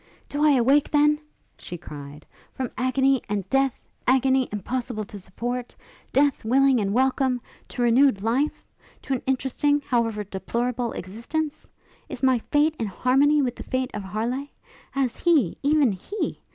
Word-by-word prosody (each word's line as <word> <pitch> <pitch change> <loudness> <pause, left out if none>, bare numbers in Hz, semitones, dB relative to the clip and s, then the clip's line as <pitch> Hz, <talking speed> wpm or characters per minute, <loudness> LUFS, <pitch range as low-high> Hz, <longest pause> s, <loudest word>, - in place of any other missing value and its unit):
'Do 290 +1 -1
I 300 -1 +6
awake, 275 +3 +3
then,' 295 0 +3 0.4
she 175 - -7
cried, 150 -3 -10 0.3
'from 255 -2 -4
agony 265 +2 +2
and 200 -2 -2
death 270 -2 +2 0.3
agony, 260 0 +3
impossible 225 +2 -3
to 205 0 -10
support! 240 +6 -5 0.4
death, 280 0 +2
willing 265 +2 +4
and 200 -2 0
welcome! 260 +1 +2 0.3
to 245 - -3
renewed 240 -3 +4
life? 255 +7 0 0.4
to 275 - -2
an 255 - -1
interesting, 265 +2 +1
however 230 -6 0
deplorable, 235 +5 -2
existence? 235 - -4 0.4
is - - -7
my 260 -2 +4
fate 295 +6 +1
in 225 - -1
harmony 275 +8 +3
with 245 -2 -1
the - - -8
fate 255 0 -2
of 210 - -4
Harleigh? 230 +8 -3 0.4
Has 265 -4 -1
he, 305 - +2
even 290 -4 +3
he! 380 - -4
255 Hz, 150 wpm, -24 LUFS, 225-275 Hz, 0.4 s, I